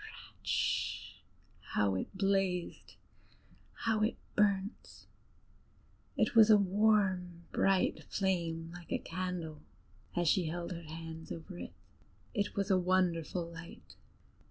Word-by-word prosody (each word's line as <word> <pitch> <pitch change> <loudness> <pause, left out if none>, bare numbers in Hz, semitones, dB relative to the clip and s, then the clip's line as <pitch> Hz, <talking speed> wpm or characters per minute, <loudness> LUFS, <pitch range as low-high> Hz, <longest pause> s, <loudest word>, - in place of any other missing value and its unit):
"Rischt!" - - -1 0.6
how 100 -2 +3
it 95 - -3
blazed, 195 -2 0 0.9
how 220 -1 +2
it 215 - +1 0.2
burnt! 200 0 0 1.1
It - - +2
was 225 -1 +8
a 215 - +9
warm, 190 -3 +2
bright 195 -1 +2
flame, 170 -4 -1
like 175 -1 -11
a - - +2
candle, 170 -3 -4 0.5
as 175 -1 +1
she 180 +3 +4
held 170 +2 -4
her 170 -1 -5
hands 160 0 -8
over 170 +3 -7
it: - - -7 0.6
it 205 -3 -1
was 200 0 0
a 185 - +5
wonderful 180 -2 +1
light. 165 0 -11
180 Hz, 115 wpm, -33 LUFS, 165-195 Hz, 1.1 s, a